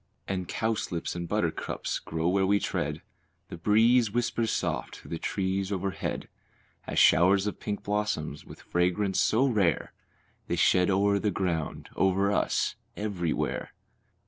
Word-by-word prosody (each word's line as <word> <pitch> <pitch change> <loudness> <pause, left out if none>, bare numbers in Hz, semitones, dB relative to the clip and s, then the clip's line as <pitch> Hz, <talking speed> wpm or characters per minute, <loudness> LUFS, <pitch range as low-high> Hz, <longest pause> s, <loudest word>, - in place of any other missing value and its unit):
And 95 -2 -2
cowslips 110 -8 -2
and 85 -1 -4
buttercups - - -2
grow 80 +1 -2
where 95 +1 +2
we 100 +1 +3
tread, 75 -4 -2 0.5
The - - -6
breeze 115 +5 +4
whispers 115 0 0
soft - - -2
through - - -13
the 85 - -3
trees 95 0 -1
overhead, 95 -1 -3 0.6
As - - -4
showers 95 +3 +5
of 105 - -3
pink 105 -1 -4
blossoms, 100 -8 -2
with - - -13
fragrance 90 +2 +1
so 120 +5 +3
rare, 105 -10 +1 0.5
They - - 0
shed 90 0 +4
o'er 100 +1 +3
the 105 - 0
ground, 85 -5 -2
over 95 +1 +2
us, - - +1 0.2
everywhere. 95 -6 -2
95 Hz, 140 wpm, -28 LUFS, 90-105 Hz, 0.6 s, showers